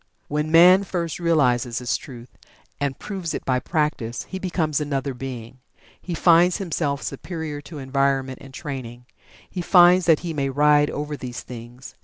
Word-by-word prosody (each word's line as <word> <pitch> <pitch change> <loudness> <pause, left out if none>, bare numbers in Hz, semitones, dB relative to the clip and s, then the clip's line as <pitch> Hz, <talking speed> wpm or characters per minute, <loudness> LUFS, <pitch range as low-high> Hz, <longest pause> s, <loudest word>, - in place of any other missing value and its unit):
When 150 +1 -1
man 180 +4 +7
first 170 -4 -3
realizes 125 -8 +1
this 120 -3 -1
truth, 120 +1 -10 0.4
and 140 -1 -2
proves 190 -5 -5
it - - -6
by 130 -1 +1
practice, 150 -7 -2
he 190 - -7
becomes 165 -6 -1
another 140 -2 -2
being. 125 -1 -8 0.4
He 175 - -4
finds 175 +2 +4
himself 150 -7 -2
superior 155 0 -5
to 155 +2 -10
environment, 135 -1 -1
and 135 - -12
training 130 -5 -7 0.4
he 180 - -5
finds 180 0 +5
that 160 -3 +4
he 170 -2 -4
may 140 -2 -1
ride 145 +1 +4
over 150 0 -4
these 125 -3 -7
things. 120 +1 -10
145 Hz, 160 wpm, -23 LUFS, 130-170 Hz, 0.4 s, man